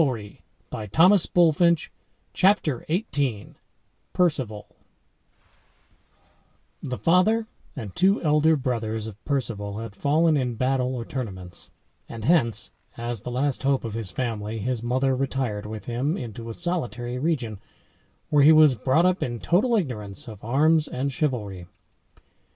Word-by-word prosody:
PALED 135 -6 +1 0.6
(in 105 -2 -5
heraldry), 180 +6 +7 0.3
striped] 170 +1 +2 0.4
CHAPTER 185 - +2
XVIII 140 - -1 0.6
PERCEVAL 130 - 0 2.1
The 125 -1 -4
father 200 +7 +3 0.3
and 110 -9 -7
two 195 +3 +3
elder 155 +1 +4
brothers 115 -5 -2
of 110 -2 -10
Perceval 105 -8 -2
had 110 -2 -7
fallen 155 +6 +2
in 125 -3 -1
battle 130 +1 0
or 120 -2 -5
tournaments, 95 -10 -7 0.4
and 115 -2 -7
hence, 135 -8 +2 0.3
as 120 -2 -4
the - - -6
last 130 +2 -1
hope 135 0 +1
of 115 -3 -5
his 110 -4 -4
family, 110 -3 -3
his 120 +2 -2
mother 130 +3 +1
retired 130 -6 -2
with 110 0 -7
him 130 +8 -1
into 115 -1 -7
a - - -5
solitary 125 -8 -3
region, 130 - -2 0.7
where 150 -1 +5
he 150 +3 +8
was 155 -3 +7
brought 130 +9 +2
up 185 0 +2
in 120 -1 -2
total 225 - +2
ignorance 110 - -3
of 110 -3 -10
arms 150 +6 +3
and 140 +2 -2
chivalry. 105 - -2
130 Hz, 135 wpm, -25 LUFS, 115-155 Hz, 2.1 s, he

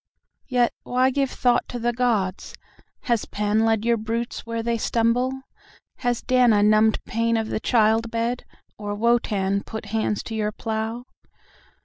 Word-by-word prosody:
"Yet, 245 -2 +2
why 255 +1 +1
give 275 0 0
thought 245 -1 +1
to 245 - -4
the 240 0 0
gods? 220 -6 -1 0.5
Has 235 -3 0
Pan 210 +1 0
led 225 -1 +1
your 235 0 +3
brutes 230 +2 -4
where 230 0 -3
they 235 0 -1
stumble?"Has 245 +1 -2
Dana 245 -5 +4
numbed 215 +1 +3
pain 230 0 0
of 220 -1 -2
the - - -2
child 225 0 +2
bed, 230 +2 -2 0.4
or 205 -1 -4
Wotan 205 -3 +1
put 220 +1 -7
hands 215 -2 0
to 225 - -7
your 215 -1 -1
plough? 225 +2 -4
230 Hz, 145 wpm, -23 LUFS, 215-240 Hz, 0.5 s, Dana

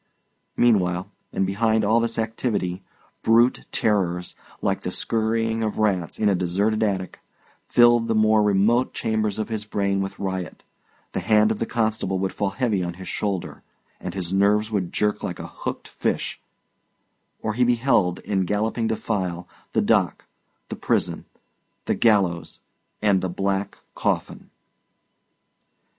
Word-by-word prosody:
Meanwhile, 90 -6 +2 0.2
and 95 - 0
behind 110 +3 +1
all 110 +3 +4
this 115 0 -1
activity, 110 -5 -2 0.4
brute 115 +2 +3
terrors, 90 -5 0 0.2
like - - -1
the - - -3
scurrying 115 0 0
of 110 - -2
rats 95 -6 0
in 105 - +1
a 100 - +4
deserted 95 +4 0
attic, 95 -4 -1 0.5
filled 120 -1 +5
the 115 - +1
more 110 0 +4
remote 105 +5 +2
chambers 110 -2 -1
of 110 - -3
his 110 -2 -3
brain 100 -2 0
with 95 - -4
riot; 95 -2 -4 0.5
the - - -2
hand 105 +3 +4
of 110 - -2
the 115 - -1
constable 110 -5 0
would 95 0 -2
fall 100 -2 -1
heavy 105 -3 0
on 85 -1 -4
his 95 0 -9
shoulder, 100 -4 -3 0.4
and - - -6
his 90 -1 -3
nerves 105 +3 +3
would 95 -5 -1
jerk 105 0 0
like - - -4
a - - -7
hooked - - -6
fish; - - -2 1.0
or 110 - -1
he 125 +3 +2
beheld, 120 -7 +2
in 95 -2 0
galloping 110 +4 0
defile, 95 -6 -2 0.3
the - - +3
dock, - - +1 0.4
the - - -4
prison, - - -1 0.6
the - - +1
gallows, 95 -7 +1 0.4
and 100 -3 +3
the 95 - -2
black 95 +2 -2 0.2
coffin. - - -2
105 Hz, 145 wpm, -24 LUFS, 95-110 Hz, 1.0 s, filled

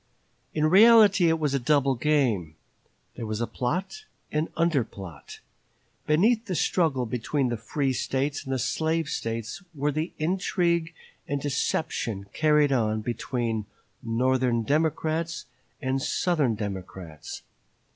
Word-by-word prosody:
In 155 0 +2
reality 200 0 +7
it 160 - +2
was 150 -3 -1
a 140 - +2
double 140 +1 +2
game. 120 - +1 0.6
There 115 - -5
was 110 0 -3
plot 185 - -3 0.3
and 155 +2 0
under 165 -6 +2
plot. 95 -8 -11 0.7
Beneath 220 +9 +3
the 185 - -2
struggle 155 -8 +1
between 125 +3 -1
the 120 - -1
free 135 +4 -1
States 135 +3 -1
and 135 - -6
the 130 - +1
slave 160 +5 0
States 115 - -4
were 145 +1 0
the 155 +4 -2
intrigue 170 -1 0 0.3
and 145 - -1
deception 135 -7 -2
carried 150 -2 +3
on 110 -4 +1
between 115 -1 -2 0.3
Northern 125 0 +1
Democrats 160 +4 0 0.4
and 130 +1 0
Southern 150 -6 +1
Democrats. 95 -6 -7
140 Hz, 125 wpm, -26 LUFS, 115-160 Hz, 0.7 s, reality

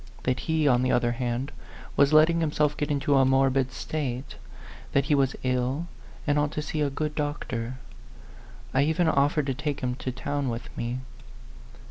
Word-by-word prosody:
That 130 0 0
he, 160 -2 +1
on 125 -2 +4
the 130 - +1
other 120 -1 +2
hand, 125 +3 -2 0.4
was 140 0 +4
letting 155 +2 +6
himself 150 -2 +1
get 150 - -2
into 145 0 +2
a 135 - +6
morbid 135 0 +3
state; 130 -2 -4 0.6
that 140 0 +3
he 150 - +2
was 135 -2 +2
ill, 130 +5 0 0.4
and 145 0 +2
ought 145 0 +1
to 150 - -2
see 155 0 -3
a 145 - +2
good 150 +2 -3
doctor. 130 -5 -3 1.0
I 135 - +4
even 160 +4 +2
offered 145 0 +2
to 135 - 0
take 145 +1 -3
him 125 -1 -1
to 130 - -3
town 140 +1 -2
with 115 0 -6
me. 120 +2 -3
140 Hz, 175 wpm, -27 LUFS, 130-150 Hz, 1.0 s, letting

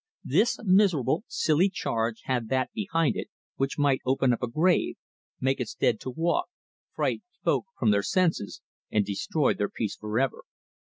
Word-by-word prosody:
This 235 - +2
miserable, 185 - +3
silly 165 +5 +2
charge 115 - -2
had 125 -4 -1
that 130 -1 0
behind 165 -8 0
it - - -4 0.3
which 135 0 -1
might 140 -3 +2
open 130 -1 +2
up 120 - -3
a 125 - 0
grave, 170 +9 +2 0.4
make 135 +1 +1
its 125 - -4
dead 115 -3 +1
to - - -6
walk, 170 - 0 0.5
fright - - 0 0.2
folk - - +1
from - - +3
their 100 -1 +3
senses, 170 - 0 0.3
and 105 -2 +1
destroy 130 +9 0
their 105 - -2
peace 110 -3 -3
for 105 +1 -4
ever. 135 -1 0
135 Hz, 165 wpm, -27 LUFS, 115-170 Hz, 0.5 s, miserable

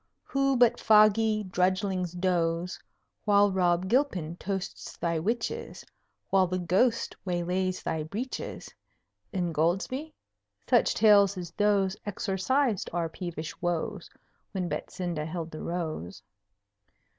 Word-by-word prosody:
Who 275 -1 +1
but 240 -1 +4
foggy 215 0 +5
drudglings 185 -1 0
doze 175 -1 0 0.4
While 205 -1 +4
Rob 180 -1 +2
Gilpin 190 - +1
toasts 195 -1 -5
thy 170 -1 -1
witches, 230 +8 -3 0.5
While 190 -1 +4
the 185 +1 -1
Ghost 195 +7 +1
waylays 180 +1 -1
thy 160 -1 -1
breeches, 215 +12 -5 0.6
Ingoldsby? 180 - -1 0.6
Such - - +3
tales 200 -3 +5
as 175 -2 -6
those 200 -2 +2
Exorcised 205 +4 0
our 170 -1 -1
peevish 165 -2 -6
woes 175 +2 -2 0.4
When 185 -3 -1
Betsinda 170 -4 -3
held 165 0 -5
the 155 - -7
Rose. 160 - -4
185 Hz, 110 wpm, -28 LUFS, 175-210 Hz, 0.6 s, foggy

